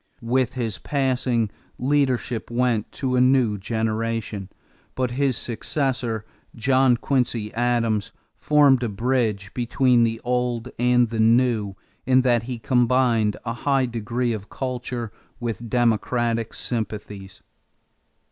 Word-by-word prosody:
With 125 Hz, +2 st, 0 dB
his 115 Hz, -7 st, -3 dB
passing, 125 Hz, -, 0 dB, 0.3 s
leadership 130 Hz, -4 st, 0 dB
went 120 Hz, -3 st, 0 dB
to 130 Hz, -2 st, -1 dB
a 125 Hz, -, +4 dB
new 125 Hz, -5 st, +3 dB
generation; 110 Hz, -1 st, -2 dB, 0.5 s
but 130 Hz, -2 st, -1 dB
his 130 Hz, -1 st, +1 dB
successor, 120 Hz, -2 st, -2 dB, 0.3 s
John 130 Hz, +1 st, +3 dB
Quincy 120 Hz, -5 st, -1 dB
Adams, 115 Hz, -3 st, 0 dB, 0.2 s
formed 145 Hz, -4 st, +4 dB
a 120 Hz, -, -1 dB
bridge 110 Hz, -2 st, -1 dB
between 125 Hz, 0 st, +2 dB
the 115 Hz, 0 st, 0 dB
old 125 Hz, -1 st, -1 dB
and 125 Hz, -1 st, +3 dB
the 115 Hz, -, -3 dB
new 115 Hz, -3 st, +3 dB, 0.3 s
in 130 Hz, 0 st, +5 dB
that 120 Hz, -3 st, +3 dB
he 125 Hz, -, -3 dB
combined 120 Hz, -2 st, +2 dB
a 115 Hz, -, -2 dB
high 135 Hz, +2 st, +1 dB
degree 120 Hz, +1 st, -2 dB
of 105 Hz, -2 st, -7 dB
culture 125 Hz, -3 st, -4 dB, 0.3 s
with 115 Hz, -1 st, -4 dB
democratic 115 Hz, -1 st, 0 dB
sympathies. 105 Hz, -4 st, -5 dB
120 Hz, 120 wpm, -23 LUFS, 110-125 Hz, 0.5 s, in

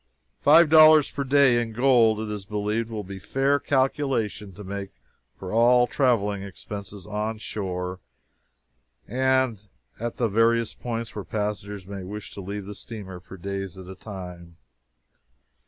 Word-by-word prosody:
Five 160 Hz, +3 st, +7 dB
dollars 155 Hz, -1 st, +7 dB
per 140 Hz, -, -3 dB
day, 135 Hz, -3 st, +4 dB
in 115 Hz, -1 st, -5 dB
gold, 115 Hz, -3 st, +4 dB
it 110 Hz, -, -4 dB
is 100 Hz, -2 st, -6 dB
believed, 105 Hz, +2 st, -2 dB
will 110 Hz, -2 st, -4 dB
be 95 Hz, 0 st, -8 dB
a -, -, -9 dB
fair 135 Hz, +7 st, +1 dB
calculation 130 Hz, -7 st, 0 dB
to 105 Hz, -, -10 dB
make 100 Hz, 0 st, -5 dB, 0.5 s
for 95 Hz, 0 st, -7 dB
all 120 Hz, +2 st, +5 dB
traveling 110 Hz, -7 st, +1 dB
expenses 100 Hz, 0 st, -8 dB
onshore 105 Hz, -4 st, -4 dB, 1.1 s
and 130 Hz, -2 st, +1 dB, 0.4 s
at 120 Hz, +1 st, -4 dB
the 120 Hz, -, +1 dB
various 115 Hz, +1 st, +2 dB
points 115 Hz, -2 st, -5 dB
where 105 Hz, -, -5 dB
passengers 105 Hz, -2 st, -4 dB
may 100 Hz, 0 st, -7 dB
wish 105 Hz, +3 st, -7 dB
to 100 Hz, -, -8 dB
leave 100 Hz, +1 st, -5 dB
the 105 Hz, -, -7 dB
steamer 100 Hz, -4 st, -8 dB
for 95 Hz, +1 st, -12 dB
days 95 Hz, 0 st, -5 dB
at 95 Hz, -, -9 dB
a 95 Hz, -, -8 dB
time. 90 Hz, -4 st, -9 dB
105 Hz, 150 wpm, -25 LUFS, 100-120 Hz, 1.1 s, Five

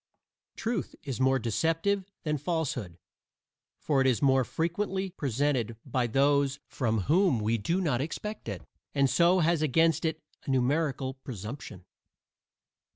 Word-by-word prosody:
Truth 225 Hz, -4 st, -3 dB
is 130 Hz, -2 st, -4 dB
more 130 Hz, 0 st, +4 dB
deceptive 165 Hz, -, 0 dB, 0.2 s
than 150 Hz, -2 st, -1 dB
falsehood, 135 Hz, -, -2 dB, 0.8 s
for 140 Hz, -3 st, +1 dB
it 130 Hz, -, +3 dB
is 125 Hz, -3 st, +2 dB
more 135 Hz, -2 st, +4 dB
frequently 190 Hz, -, -2 dB
presented 135 Hz, -, -1 dB
by 125 Hz, -2 st, 0 dB
those 140 Hz, +2 st, +2 dB
from 110 Hz, -5 st, -1 dB
whom 165 Hz, -, +3 dB
we 110 Hz, +2 st, 0 dB
do 165 Hz, -, 0 dB
not 145 Hz, -9 st, +1 dB
expect 205 Hz, -, -5 dB
it, 100 Hz, -4 st, -5 dB, 0.3 s
and 140 Hz, -1 st, +4 dB
so 170 Hz, +7 st, +4 dB
has 165 Hz, -1 st, +2 dB
against 160 Hz, +3 st, +3 dB
it 160 Hz, -1 st, -1 dB, 0.3 s
a -, -, -3 dB
numerical 135 Hz, +1 st, +1 dB
presumption. 115 Hz, -, -8 dB
140 Hz, 135 wpm, -29 LUFS, 125-165 Hz, 0.8 s, more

